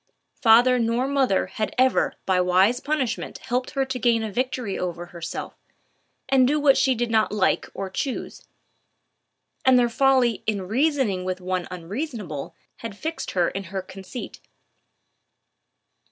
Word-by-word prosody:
Father 245 +2 +6
nor 235 +3 +1
mother 270 -8 +2
had 215 - -4
ever 255 0 +3
by 185 -1 +2
wise 185 +7 +3
punishment 275 -5 -2
helped 250 +1 -2
her 270 - +2
to 260 -1 -4
gain 230 -1 +2
a 220 - -4
victory 250 -2 -2
over 175 -1 -4
herself, 170 0 -6 0.7
and 260 -1 +4
do 300 +3 +2
what 285 -2 +5
she 265 -1 +3
did 240 0 -2
not 220 -1 +2
like 210 -2 +1
or 195 - -3
choose; 250 +7 -4 1.2
and 260 -1 +6
their 240 -1 +3
folly 255 -2 +3
in 205 -3 0
reasoning 255 -5 +1
with 185 0 -3
one 185 -1 -2
unreasonable 185 - -5 0.2
had 225 -3 -7
fixed 320 +5 -4
her 175 -1 +3
in 195 0 -5
her 190 +1 -5
conceit. 190 +5 -9
230 Hz, 145 wpm, -24 LUFS, 190-260 Hz, 1.2 s, Father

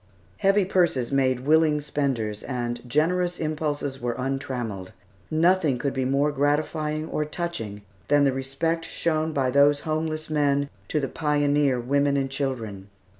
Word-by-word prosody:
Heavy 195 0 +3
purses 170 -10 +1
made 130 -2 +2
willing 155 +2 +3
spenders, 130 -8 -2
and 120 -2 -3
generous 175 +6 +1
impulses 150 -4 -2
were 120 -1 -1
untrammelled. 125 -8 -4 0.4
Nothing 160 -3 +3
could 140 +2 -2
be 130 -1 -1
more 140 +3 +2
gratifying 150 +2 0
or 150 - -1
touching 150 -11 -5 0.2
than 145 0 +4
the 135 -2 +3
respect 135 +6 -2
shown 160 -1 -1
by 135 -4 0
those 145 +1 +4
homeless 155 0 -2
men 145 -2 +1 0.2
to 150 - 0
the 135 - -1
pioneer 145 -3 +1
women 140 +3 +1
and 135 -1 -1
children. 115 -8 -4
145 Hz, 140 wpm, -25 LUFS, 130-155 Hz, 0.4 s, than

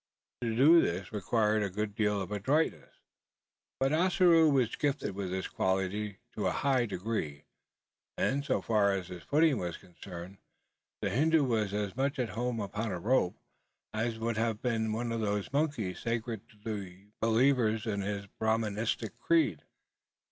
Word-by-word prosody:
To 115 -2 -1
do 155 +7 +7
this 90 +2 -2
required, 105 +1 +1
a 100 - 0
good 105 +2 -3
deal 105 -1 +1
of 95 - -6
adroitness; 130 +11 0 0.8
but 135 +2 +2
Ossaroo 175 -1 +5
was 130 -5 +2
gifted 140 -8 -1
with 95 -1 -4
this 95 +1 -2
quality 95 +2 -1 0.2
to - - -1
a - - +2
high 130 -4 +1
degree; 90 -8 -3 0.7
and, 140 +2 +1
so 145 - 0
far 105 -3 +3
as 95 -2 -3
his 90 -2 -8
footing 150 - +3
was 90 -2 -3
concerned, 90 +1 -10 0.6
the - - 0
Hindoo 155 +3 +3
was 110 -6 0
as 105 0 -2
much 140 +3 0
at 125 -3 -1
home 120 +2 -2
upon 105 +2 -3
a 90 - -2
rope, 105 -2 +1 0.6
as 110 +1 -1
would 115 0 -2
have 110 -1 0
been 110 -3 0
one 115 +2 -2
of 115 -1 -1
those 105 +2 -2
monkeys 140 - 0
sacred 115 -2 -3
to 105 - -21
the 100 -2 -7
believers 115 -1 +3
in 100 -3 -1
his 100 0 -3
Brahministic 110 +2 -1
creed. 160 - +2
110 Hz, 160 wpm, -31 LUFS, 100-125 Hz, 0.8 s, do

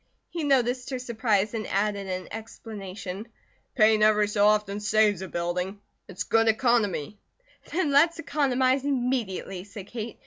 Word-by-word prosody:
He 335 -2 -3
noticed 255 -2 +1
her 260 - -2
surprise 220 -4 0
and 220 -3 -3
added 200 0 -1
in 185 0 -4
explanation: 210 -3 -7 0.5
"Paint 215 -2 +5
every 210 -1 +4
so 205 0 +3
often 210 -1 +1
saves 210 -2 +2
a 190 - -5
building. 180 +3 -3 0.3
It's 190 -2 -5
good 225 0 +2
economy." 220 - +1 0.5
"Then 335 -5 0
let's 325 +5 +4
economize 265 -4 +1
immediately," 245 -9 -2
said 200 -1 -10
Kate. 225 +1 -7
215 Hz, 140 wpm, -26 LUFS, 200-250 Hz, 0.5 s, Paint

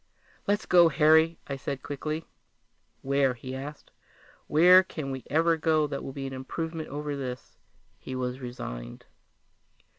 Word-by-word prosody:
"Let's 205 +1 +1
go, 175 -2 +6
Harry," 160 +2 +4
I 140 - -4
said 135 0 -5
quickly. 155 +3 -4 0.8
"Where?" 135 -1 +2
he 130 +2 -7
asked. 145 +3 -8 0.6
"Where 180 +4 +7
can 155 -6 -6
we 130 -2 -5
ever 165 +3 +3
go 155 -1 +2
that 140 -1 -4
will - - -5
be 135 0 -6
an 135 - -5
improvement 160 +5 -5
over 145 +1 -4
this?" 125 -3 -6 0.4
He 130 - -7
was 125 0 -3
resigned. - - -7
145 Hz, 145 wpm, -28 LUFS, 130-160 Hz, 0.8 s, Where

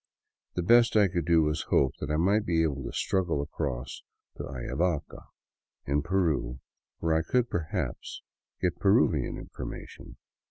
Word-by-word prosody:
The 90 - -1
best 120 +5 +5
I 105 -2 +6
could 85 -3 -2
do 85 -2 +5
was 75 +1 0
to - - -10
hope 65 - +4
I 75 - -1
might 100 +7 +3
be 85 -4 +2
able 70 -4 -1
to - - -4
struggle 90 -6 0
across 70 -4 -4 0.3
to - - -6
Ayavaca, 70 +6 -3 0.6
in 70 +1 +1
Peru, 80 -8 0 0.4
where 80 -1 0
I 80 - +3
could 125 +7 0
perhaps 80 -3 -3 0.4
get - - -1
Peruvian - - +3
information. - - -9
80 Hz, 150 wpm, -28 LUFS, 70-90 Hz, 0.6 s, I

